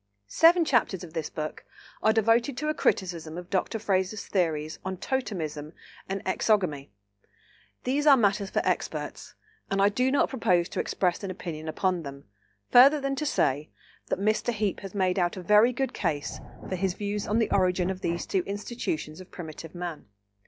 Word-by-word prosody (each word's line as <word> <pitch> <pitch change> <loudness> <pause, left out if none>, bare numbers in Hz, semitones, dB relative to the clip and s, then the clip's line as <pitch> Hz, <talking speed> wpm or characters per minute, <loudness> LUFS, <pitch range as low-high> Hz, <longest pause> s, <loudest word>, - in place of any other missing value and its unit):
Seven 330 - +5
chapters 220 - +1
of 165 -2 -10
this 160 -3 -3
book 155 -1 -5 0.4
are 220 - +4
devoted 230 +4 +2
to 305 +3 -1
a - - +1
criticism 170 - -1
of 180 0 -9
Dr. 195 +3 0
Frazer's 200 -1 -1
theories 160 -5 -1
on 190 0 -4
totemism 165 - -3 0.4
and 195 +1 -3
exogamy. 185 -8 +1 0.9
These 285 +4 0
are 280 -2 +8
matters 200 -3 +1
for - - 0
experts, - - -3 0.3
and 195 - 0
I 200 +1 +5
do 250 +5 +1
not 280 - +2
propose 180 -9 +2
to - - -4
express 180 +1 0
an 195 - -3
opinion 165 -4 -6
upon 180 +2 0
them, 140 -2 -8 0.5
further 275 +5 +8
than 275 0 -1
to 300 - -1
say 145 - +1 0.4
that - - -1
Mr. 215 +4 +1
Heape 210 -3 -1
has 195 0 -9
made 185 -1 +1
out 175 +1 0
a 185 - -6
very 210 +6 +5
good 265 +2 -2
case 155 -6 -2 0.3
for 185 - -2
his 185 0 -1
views 205 0 -3
on 210 - +1
the 230 - +1
origin 185 -1 +2
of 190 0 -6
these 170 0 -2
two 190 - 0
institutions 200 -6 -4
of 185 - -13
primitive 165 -1 -9
man. 175 -6 -6
190 Hz, 180 wpm, -27 LUFS, 170-225 Hz, 0.9 s, are